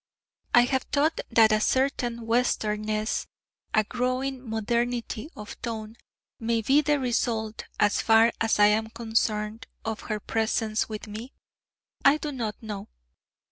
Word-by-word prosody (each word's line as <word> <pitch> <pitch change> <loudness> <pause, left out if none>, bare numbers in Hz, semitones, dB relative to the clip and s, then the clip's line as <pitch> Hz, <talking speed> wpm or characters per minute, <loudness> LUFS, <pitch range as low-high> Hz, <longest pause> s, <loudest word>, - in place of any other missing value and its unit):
I 240 - +9
have 260 +1 +1
thought 300 +3 +2
that 225 -2 +5
a 215 0 +3
certain 245 -2 0
Western 225 -3 +1
ness 215 +1 -1 0.4
a 215 - +3
growing 255 +3 -2
modernity 235 +3 -1
of 210 0 -9
tone 220 -1 -5 0.4
may 230 0 0
be 275 +6 +5
the 295 -1 +1
result, 230 -3 -1
as 205 -1 +3
far 225 +1 +5
as 225 -1 +2
I 205 - +7
am 215 +1 +2
concerned, 220 0 -1 0.2
of 220 -1 -2
her 215 -1 -1
presence 220 0 0
with 215 0 -5
me? 220 +5 -8 0.7
I 280 +2 +6
do 300 -1 -4
not 230 -5 -4
know.... 210 -1 -6
225 Hz, 140 wpm, -27 LUFS, 215-250 Hz, 0.7 s, I